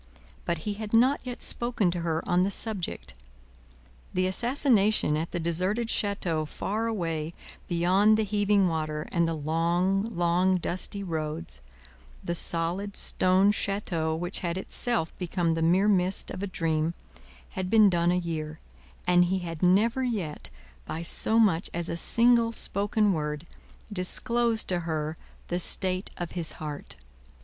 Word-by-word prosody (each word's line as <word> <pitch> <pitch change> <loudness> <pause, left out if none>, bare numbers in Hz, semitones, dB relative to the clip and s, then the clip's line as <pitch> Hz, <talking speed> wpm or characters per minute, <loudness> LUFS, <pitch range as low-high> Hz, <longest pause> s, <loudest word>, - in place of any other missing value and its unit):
But, 170 - -1
he 210 - -1
had 210 +1 -7
not 255 +5 +4
yet 250 -2 -6
spoken 235 -6 +1
to 175 - -3
her 165 -1 -2
on 180 +1 +3
the 195 - +1
subject; 200 - -4 1.0
the 185 - +2
assassination 215 - +2
at 160 +2 -2
the 175 - -3
deserted 185 +8 -1
chateau 185 -7 -1
far 215 +8 -3
away 165 -7 -3 0.3
beyond 185 +5 +3
the 220 - +1
heaving 205 -1 +2
water 155 -2 -3
and 170 -1 +2
the 165 - -1
long, 170 +5 0
long, 180 -2 +1
dusty 185 +3 -2
roads 160 - -5 0.6
the 170 - -2
solid 175 +4 +1
stone 185 +2 +3
chateau 180 -6 -2
which 175 +3 -2
had 170 0 -3
itself 205 -2 -1
become 175 -2 0
the 165 - -2
mere 180 +5 +3
mist 185 -2 +1
of - - -6
a 200 - -2
dream 165 -2 -1 0.6
had 185 -1 -4
been 215 -1 +6
done 175 -2 +2
a 180 - +1
year, 160 -3 -4 0.5
and 180 0 +4
he 190 +2 0
had 165 -3 -6
never 210 +8 +3
yet, 200 -12 -3 0.3
by 160 - -5
so 220 +6 +4
much 195 -6 +3
as 170 -1 -2
a - - -2
single 235 +6 +3
spoken 205 -1 0
word, 150 -1 -3 0.5
disclosed 230 +5 +3
to 180 -2 +2
her 160 -2 -3 0.3
the 175 - -1
state 185 +1 0
of 175 -2 -5
his 170 -3 -2
heart. 150 -2 -7
180 Hz, 150 wpm, -27 LUFS, 165-205 Hz, 1.0 s, been